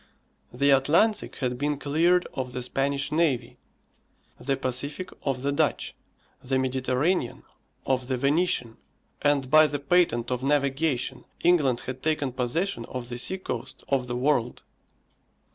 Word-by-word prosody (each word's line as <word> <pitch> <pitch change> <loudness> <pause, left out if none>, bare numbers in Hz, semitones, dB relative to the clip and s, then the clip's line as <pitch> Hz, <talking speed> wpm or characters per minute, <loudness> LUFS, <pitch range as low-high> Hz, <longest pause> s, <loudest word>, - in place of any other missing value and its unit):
The 140 +3 +2
Atlantic 165 +11 +3
had 125 -3 -2
been 145 0 0
cleared 165 +6 +2
of 125 -1 -4
the 125 - -2
Spanish 140 +2 -1
navy, 150 -7 0 0.8
the 135 0 -1
Pacific 140 +8 -3
of 135 -2 -2
the 140 - +1
Dutch, 140 - 0 0.5
the 130 +1 0
Mediterranean 130 +2 0 0.4
of 130 -2 0
the 130 -1 -1
Venetian, 140 -4 +1 0.4
and 145 -2 +2
by 155 0 +7
the 145 -1 -3
patent 140 -6 +2
of 125 0 -1
navigation, 140 -1 0 0.2
England 150 -9 +3
had 130 0 -6
taken 150 -4 0
possession 125 +3 -1
of 125 0 -6
the 120 0 -4
sea 190 +9 0
coast 130 -7 -6
of 130 -2 +1
the 120 - -3
world. 125 -2 0
135 Hz, 140 wpm, -26 LUFS, 125-150 Hz, 0.8 s, by